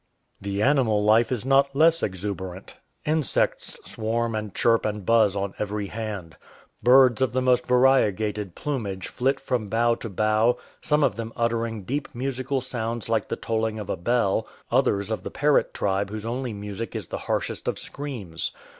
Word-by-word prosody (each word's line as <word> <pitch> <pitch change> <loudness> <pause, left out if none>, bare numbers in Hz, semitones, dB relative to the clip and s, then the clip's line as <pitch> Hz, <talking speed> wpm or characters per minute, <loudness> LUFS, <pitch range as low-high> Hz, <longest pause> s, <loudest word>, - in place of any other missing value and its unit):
The 100 +1 -2
animal 125 -7 +3
life 110 +3 +4
is 125 -2 -1
not 135 +1 +3
less 165 +3 +5
exuberant. 95 -1 -4 0.3
Insects 155 -2 0
swarm 115 +1 -2
and 110 -1 -3
chirp 115 -1 +3
and 105 -2 -3
buzz 110 -3 +4
on 100 -1 -2
every 105 0 -2
hand. 100 -6 -6 0.4
Birds 125 -1 +6
of 130 -2 +1
the 130 - +1
most 125 -1 +2
variegated 110 -6 +2
plumage 105 -11 -3
flit 135 +2 0
from 125 -5 -2
bough 115 +3 +2
to 115 - -6
bough, 110 +4 +2 0.2
some 150 0 +2
of 100 - +1
them 115 -1 -4
uttering 115 -2 -1
deep 140 +8 -3
musical 130 +1 -2
sounds 120 -2 -4
like 110 -2 +1
the - - -2
tolling 110 -1 -2
of 105 -2 -4
a - - 0
bell, 110 +2 +1 0.2
others 110 -5 +2
of 110 - -2
the - - -6
parrot 145 +1 +2
tribe 100 0 -1
whose 110 +1 -6
only 125 +1 -3
music 105 +2 -6
is - - -5
the - - -4
harshest - - -2
of - - 0
screams. 120 - -5
115 Hz, 170 wpm, -25 LUFS, 105-130 Hz, 0.4 s, Birds